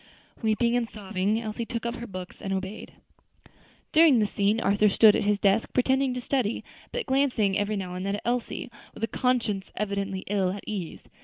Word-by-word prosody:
Weeping 235 +1 +2
and 235 -2 0
sobbing, 205 0 -1
Elsie 220 0 -4
took 235 -2 -4
up 235 +1 -2
her 240 - -7
books 185 -3 -8
and 195 - -4
obeyed. 195 +2 -4 1.0
During 315 -4 +6
this 210 -2 +1
scene 205 +2 +2
Arthur 205 0 +3
stood 210 +1 +6
at - - 0
his 205 0 +3
desk 200 +2 +2
pretending 265 +1 +2
to 250 - -3
study, 245 -4 -1 0.3
but - - -3
glancing 255 -7 +2
every 205 +1 0
now 185 -3 -4
and 180 +1 -4
then 200 +1 -1
at 205 - -7
Elsie, 240 +1 -2 0.2
with - - -8
a - - +2
conscience 225 -5 0
evidently 200 -2 -2
ill 190 -2 0
at 205 - -7
ease. 190 -6 -5
210 Hz, 190 wpm, -27 LUFS, 195-240 Hz, 1.0 s, During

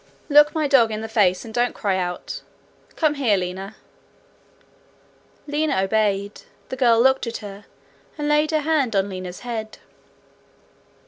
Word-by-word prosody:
'Look 295 +2 +6
my 310 -2 +1
dog 260 -5 +5
in 215 0 -4
the 220 - -5
face 205 -5 +2
and 220 - -9
don't 245 +1 0
cry 200 -3 0
out. 180 -1 -4 0.5
Come 310 -2 +2
here, 250 -8 +2
Lina.' 190 +3 -5 1.7
Lina 295 -6 0
obeyed. 200 0 0 0.3
The - - -4
girl 240 -3 +4
looked 265 +1 +3
at 230 - -3
her, 200 0 -10 0.5
and 295 -1 -2
laid 300 +1 +2
her 310 -2 +1
hand 290 -7 0
on 195 +1 +1
Lina's 185 -1 -7
head. 225 -3 -5
225 Hz, 145 wpm, -22 LUFS, 200-285 Hz, 1.7 s, Look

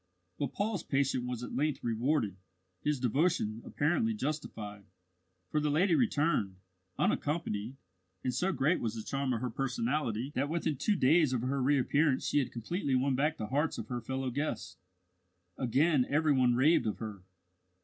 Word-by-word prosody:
But 140 -3 -2
Paul's 205 -1 -1
patience 135 -3 0
was 125 -1 -4
at - - -6
length 150 0 0
rewarded, 115 - 0 0.5
his 150 -2 +1
devotion 125 -3 +1
apparently 195 +10 0
justified, 110 - -4 0.7
for 155 - +2
the 150 0 0
lady 170 +5 +3
returned, 150 - +2 0.4
unaccompanied; 135 -7 -1 0.5
and 125 - 0
so 180 +10 +1
great 150 +3 +2
was 115 -1 -2
the 110 - -5
charm 135 +1 -1
of 115 -2 -1
her 125 -2 -2
personality 125 0 -1
that 140 +3 0
within 160 -3 -1
two 210 +9 +1
days 155 -2 +4
of 125 - 0
her 135 +2 -1
reappearance 140 +1 +2
she - - +2
had 135 - -1
completely 135 - -2
won 135 +2 +2
back 150 +4 +1
the 110 - -3
hearts 145 +4 0
of - - -6
her 120 -1 -3
fellow 130 +2 -3
guests. 145 +5 -3 0.8
Again 135 +2 +2
every 150 +1 +3
one 125 -2 +3
raved 140 +2 +4
of 105 - -2
her. 105 -4 -6
135 Hz, 165 wpm, -31 LUFS, 120-155 Hz, 0.8 s, days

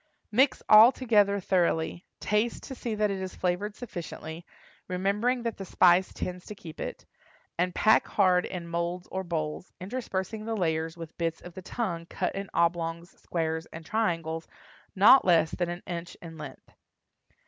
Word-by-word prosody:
Mix 260 +5 +3
all 220 +3 +9
together 205 -6 +2
thoroughly, 175 -2 0
taste 210 +3 0
to - - -7
see 235 -3 -4
that 210 -1 +1
it 195 -1 -3
is 185 -1 -5
flavored 190 +4 -1
sufficiently, 170 -6 -7 0.4
remembering 205 +7 0
that 230 -2 -3
the 195 - -6
spice 180 0 +4
tends 180 0 -5
to 210 - -7
keep 160 -5 -11
it, - - -6 0.5
and 180 0 0
pack 220 +1 +4
hard 185 -3 +3
in 175 -2 -6
moulds 170 +1 -3
or 190 0 -2
bowls, 160 -1 -4
interspersing 210 0 -4
the 225 0 -2
layers 160 -2 -1
with 165 -1 -9
bits 165 -1 -1
of 175 - -11
the 185 - -8
tongue 175 -5 -3
cut 180 - -2
in 195 0 -5
oblongs, 170 0 0
squares 160 -1 -2
and 160 0 -10
triangles 165 -7 -1 0.5
not 210 +7 +8
less 165 -3 +4
than 175 -1 -2
an 175 0 -6
inch 175 0 -6
in 165 -1 -10
length. 150 -3 -10
180 Hz, 165 wpm, -28 LUFS, 170-210 Hz, 0.5 s, all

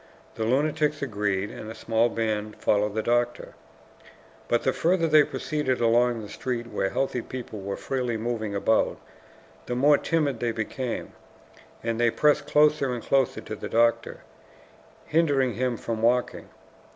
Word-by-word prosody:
The 110 - -3
lunatics 150 +4 +1
agreed, 105 -5 -1
and 110 - -8
a 110 - -7
small 115 +1 +1
band 110 -2 -2
followed 105 0 +1
the 110 - -1
doctor. 120 0 0 0.9
But 120 - +1
the 130 - +2
further 170 0 +2
they 155 -2 +6
proceeded 145 -3 -2
along 120 0 +2
the - - -8
street 120 +2 -4
where 95 -4 -2
healthy 135 -2 -1
people 115 -4 -7
were 100 0 -4
freely 125 -4 -2
moving 110 -2 -3
about, 110 +3 +1 0.7
the 120 - -2
more 145 +3 +4
timid 150 -7 0
they 120 -1 -1
became, 120 +3 -4 0.7
and 115 0 -2
they 120 0 +4
pressed 150 +5 +2
closer 150 -3 +3
and 120 -2 -4
closer 135 -2 +1
to - - -6
the - - -7
doctor, 115 +1 +1 0.8
hindering 145 -6 +2
him 125 -1 -1
from 115 -1 -4
walking. 120 +2 +1
120 Hz, 150 wpm, -26 LUFS, 110-135 Hz, 0.9 s, they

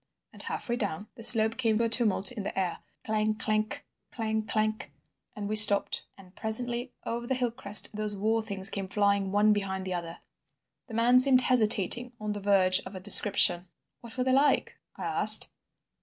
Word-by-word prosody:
And - - -8
half - - -7
way 240 0 -4
down 205 -3 -6
the - - -15
slope 220 -1 +5
came 225 -4 -2
a 230 - -1
tumult 225 -3 +3
in 235 -4 -8
the 195 - -8
air, 180 -2 -5 0.3
clang 215 0 -3
clank, 215 -1 -5 0.3
clang 220 -2 -5
clank, 215 -6 -5 0.4
and 205 -1 -8
we 215 - -5
stopped, 205 -1 +4
and 185 -1 -20
presently 240 +3 -3
over 235 +1 -7
the 260 - -3
hill 250 -2 -3
crest 210 -3 +3
those 210 -1 -3
war 220 +3 -2
things 200 -3 +1
came 195 -1 -6
flying 200 -1 -2
one 210 +1 +1
behind 190 -2 -6
the 185 - -6
other." 170 -1 -8 0.7
The 225 - -11
man 240 +2 +2
seemed 255 -1 +4
hesitating 240 0 0
on 210 -1 -6
the 205 - -8
verge 190 -2 +2
of 190 +1 -13
a - - -8
description. 185 -2 +4 0.3
"What 235 0 -11
were 250 - -2
they 260 0 -2
like?" 275 +1 -1 0.2
I - - -11
asked. - - +5
215 Hz, 185 wpm, -25 LUFS, 200-235 Hz, 0.7 s, slope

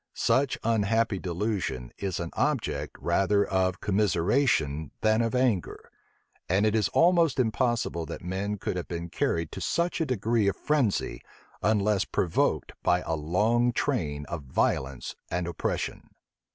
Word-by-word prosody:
Such 135 -1 +2
unhappy 115 -1 +1
delusion 90 - -2
is 95 -3 -2
an 85 -1 -4
object 90 - -1
rather 100 +1 +2
of 95 -1 0
commiseration 95 - +1
than 110 +1 +3
of 115 +2 0
anger: 125 -8 0 0.6
and 95 +4 +3
it 105 - +2
is 110 -3 +2
almost 170 -5 +3
impossible 115 -8 0
that - - -7
men 95 +4 -2
could 90 - -3
have 90 - -4
been 85 0 -5
carried 85 -1 -1
to - - -7
such 170 +1 0
a 160 - 0
degree 115 -3 +1
of 100 - +1
frenzy, 140 -9 0 0.4
unless 105 -2 +2
provoked 85 -3 0
by 90 0 +2
a 80 - -3
long 105 +10 +2
train 75 - -1
of 85 0 -5
violence 65 -1 -1
and 90 0 -1
oppression. 85 -2 -3
100 Hz, 140 wpm, -27 LUFS, 85-115 Hz, 0.6 s, than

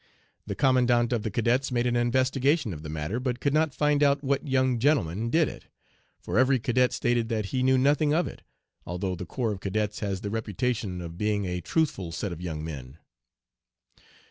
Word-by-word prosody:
The - - -3
Commandant 125 -2 +3
of 115 - 0
the 110 - -2
Cadets 120 +6 +1
made 120 -1 +1
an 120 -1 +1
investigation 130 - +1
of 75 - -8
the 75 - -7
matter, 80 +9 -3
but 125 -1 -2
could 140 - 0
not 155 0 +2
find 150 +1 +1
out 140 0 +3
what 140 +2 0
young 130 -2 +2
'gentleman' 115 - +1
did 160 +3 +3
it, - - -9 0.5
for - - -1
every 130 +1 +4
cadet 125 +1 +2
stated 120 -1 0
that 110 -3 -1
he 130 - +1
knew 130 0 +4
nothing 145 +3 +3
of 170 +4 +2
it, - - -9 0.4
although 90 +2 -3
the 90 0 -6
corps 115 +1 -1
of 100 - -5
cadets 105 +2 -2
has 100 -2 -3
the 100 - -4
reputation 110 -3 -2
of 85 0 -8
being 105 -1 0
a 90 -1 -3
truthful 120 - -1
set 90 +4 -3
of 85 0 -7
young 80 -3 -4
men. 70 -3 -8
120 Hz, 195 wpm, -27 LUFS, 95-130 Hz, 0.5 s, every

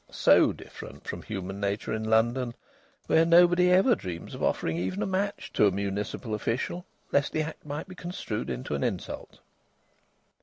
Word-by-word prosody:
So - - +5
different - - -11
from - - -4
human 95 -2 -5
nature 100 +2 -2
in 110 0 -2
London, 120 +3 +2 0.5
where 160 - +4
nobody 175 +2 +6
ever 190 +8 +5
dreams 90 - -5
of - - -7
offering 80 - 0
even 90 +1 -2
a - - 0
match 195 +2 -2
to 105 - +5
a - - +3
municipal 100 +4 -3
official, 125 - -2 0.2
lest 140 0 +2
the 155 - +1
act 155 -1 -8
might 145 +1 -4
be 185 - -9
construed 175 - -4
into 125 - -4
an - - -1
insult. 105 -8 -4
120 Hz, 165 wpm, -28 LUFS, -, 0.5 s, nobody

